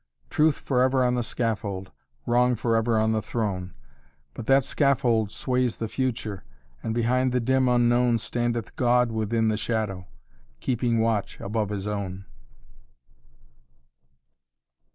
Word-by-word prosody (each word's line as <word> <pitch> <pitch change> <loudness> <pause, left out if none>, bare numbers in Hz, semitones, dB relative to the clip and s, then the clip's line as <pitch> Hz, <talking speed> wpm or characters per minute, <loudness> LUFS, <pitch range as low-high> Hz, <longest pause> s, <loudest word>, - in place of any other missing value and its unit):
Truth 155 -1 +3
forever 130 0 +2
on 125 0 +2
the 125 - 0
scaffold, 105 -5 -3 0.3
Wrong 125 +1 +3
forever 115 0 +1
on 110 0 +2
the 110 -1 0
throne; 100 -5 -3 0.6
But 110 - -8
that 135 0 +5
scaffold 120 -7 +1
sways 125 -1 0
the 115 - -3
future, 115 - -3 0.4
And 110 - -3
behind 125 +2 +1
the 125 - +1
dim 130 +1 +2
Unknown 120 0 +3
Standeth 120 +1 -3
God 125 -1 +3
within 110 0 0
the 110 - 0
shadow. 105 -5 -2 0.5
Keeping 120 -2 0
watch 110 -3 -1
above 105 0 -2
his 100 -2 -4
own." 100 -2 -4
115 Hz, 125 wpm, -25 LUFS, 110-125 Hz, 0.6 s, that